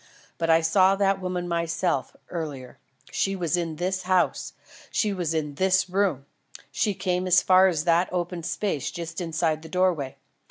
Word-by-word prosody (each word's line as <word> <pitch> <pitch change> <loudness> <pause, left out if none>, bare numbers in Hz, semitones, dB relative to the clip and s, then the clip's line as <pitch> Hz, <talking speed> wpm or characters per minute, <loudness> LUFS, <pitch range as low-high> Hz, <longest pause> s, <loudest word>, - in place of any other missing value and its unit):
But 165 -1 -1
I 165 0 +5
saw 185 +4 +4
that 195 -1 +1
woman 180 -1 -3
myself, 170 +1 -1 0.2
earlier. 145 -7 -6 0.3
She 195 0 0
was 175 -3 0
in 170 -2 -2
this 185 +3 -2
house. 185 -1 0 0.4
She 210 -2 0
was 170 -4 -2
in 150 -2 -2
this 190 -1 +2
room. 185 -8 0 0.5
She 205 +8 0
came 185 -1 -1
as 185 - +5
far 185 0 +6
as 165 -5 0
that 170 +1 +2
open 175 -1 -3
space 170 -2 -2
just 170 0 -6
inside 160 -2 -1
the 160 - -11
doorway. 175 -7 0
175 Hz, 165 wpm, -25 LUFS, 165-185 Hz, 0.5 s, far